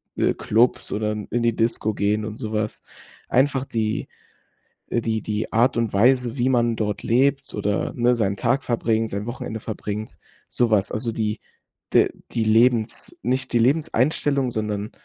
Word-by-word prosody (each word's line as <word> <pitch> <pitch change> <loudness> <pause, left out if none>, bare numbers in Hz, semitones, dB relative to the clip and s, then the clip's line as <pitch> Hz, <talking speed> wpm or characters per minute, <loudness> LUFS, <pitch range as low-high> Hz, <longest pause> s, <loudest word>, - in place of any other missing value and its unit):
äh, - - +2
Clubs 115 +3 +1
oder 105 0 -1
in 105 -1 -5
in 120 0 -1
die 115 -1 +2
Disco 115 -1 0
gehen 105 +1 0
und 110 0 -6
sowas. 110 -2 -3 0.5
Einfach 135 0 +2
die, 110 -4 -2 0.8
äh, 120 - +1
die 110 -2 -2
die 105 0 -3
Art 120 +3 +3
und 115 -2 0
Weise, 125 +4 +3
wie 125 +1 +2
man 120 -2 +2
dort 105 -2 -2
lebt 135 +3 +1
oder, 105 0 -1
ne, 120 0 +3
seinen 100 -4 0
Tag 130 +5 +1
verbringt, 115 -2 0
sein 100 +2 -4
Wochenende 120 -2 -5
verbringt, 105 0 -5 0.3
so 120 -1 +1
was. 100 -2 +2
Also, 115 +2 -1
die 110 -1 -2 0.5
de - - +5 0.2
die 115 - 0
Lebens 115 +1 +2
nicht 130 +4 -1
die 120 - +3
Lebenseinstellung, 140 0 +1
sondern 105 -1 -3
115 Hz, 165 wpm, -23 LUFS, 105-125 Hz, 0.8 s, de